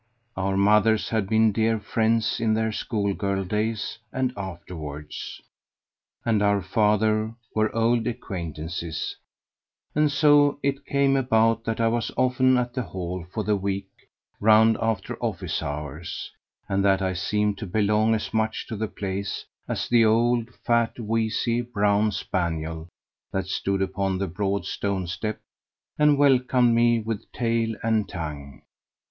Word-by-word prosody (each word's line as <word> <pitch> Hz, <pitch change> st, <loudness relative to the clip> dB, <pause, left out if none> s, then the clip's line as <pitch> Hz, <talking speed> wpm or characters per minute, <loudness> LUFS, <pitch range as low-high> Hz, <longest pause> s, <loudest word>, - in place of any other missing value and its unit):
Our 95 Hz, 0 st, -1 dB
mothers 105 Hz, +2 st, +3 dB
had 110 Hz, -4 st, -1 dB
been 110 Hz, 0 st, +4 dB
dear 110 Hz, +1 st, +1 dB
friends 110 Hz, +2 st, +1 dB
in 110 Hz, -1 st, +2 dB
their 110 Hz, 0 st, 0 dB
school 100 Hz, -2 st, -1 dB
girl 100 Hz, -1 st, -1 dB
days 105 Hz, +3 st, -2 dB
and 130 Hz, -1 st, -1 dB
afterwards; 85 Hz, -6 st, -7 dB, 0.9 s
and 110 Hz, -3 st, +2 dB
our 100 Hz, -1 st, +3 dB
fathers 110 Hz, +2 st, +2 dB, 0.2 s
were 110 Hz, 0 st, 0 dB
old 115 Hz, 0 st, +2 dB
acquaintances; 85 Hz, -, -4 dB, 0.8 s
and 150 Hz, 0 st, +2 dB
so 145 Hz, -1 st, +5 dB
it 140 Hz, 0 st, -1 dB
came 140 Hz, -1 st, +2 dB
about 115 Hz, -3 st, +2 dB
that 115 Hz, 0 st, -2 dB
I 115 Hz, -, +3 dB
was 115 Hz, 0 st, 0 dB
often 130 Hz, 0 st, +3 dB
at 120 Hz, -1 st, -1 dB
the 130 Hz, -, -1 dB
Hall 90 Hz, -5 st, -5 dB
for 110 Hz, -, -2 dB
the 105 Hz, 0 st, +1 dB
week 100 Hz, 0 st, -3 dB, 0.5 s
round 110 Hz, +1 st, +6 dB
after 110 Hz, -4 st, -2 dB
office -, -, -2 dB
hours, 75 Hz, +3 st, -5 dB, 0.4 s
and 95 Hz, 0 st, 0 dB
that 95 Hz, -1 st, +3 dB
I 95 Hz, 0 st, 0 dB
seemed 105 Hz, +2 st, 0 dB
to 105 Hz, -, -5 dB
belong 105 Hz, +3 st, +2 dB
as 110 Hz, -, -4 dB
much 110 Hz, 0 st, 0 dB
to 110 Hz, -, -3 dB
the 110 Hz, +1 st, -2 dB
place 100 Hz, -1 st, -4 dB, 0.2 s
as -, -, -2 dB
the 120 Hz, -1 st, +5 dB
old, 115 Hz, +1 st, +2 dB, 0.2 s
fat, 120 Hz, 0 st, +1 dB
wheezy, 115 Hz, +1 st, 0 dB
brown 105 Hz, -3 st, +1 dB
spaniel 80 Hz, -4 st, -3 dB, 0.4 s
that 95 Hz, 0 st, -1 dB
stood 95 Hz, +1 st, -1 dB
upon 95 Hz, 0 st, -1 dB
the 100 Hz, +1 st, -1 dB
broad 100 Hz, +1 st, -2 dB
stone 100 Hz, -2 st, -2 dB
step 105 Hz, +5 st, -4 dB, 0.6 s
and 150 Hz, -1 st, +5 dB
welcomed 125 Hz, -3 st, +4 dB
me 120 Hz, 0 st, +4 dB
with 110 Hz, -1 st, -5 dB
tail 115 Hz, -1 st, 0 dB
and 110 Hz, -2 st, +1 dB
tongue. 70 Hz, -6 st, -7 dB
110 Hz, 145 wpm, -25 LUFS, 95-115 Hz, 0.9 s, round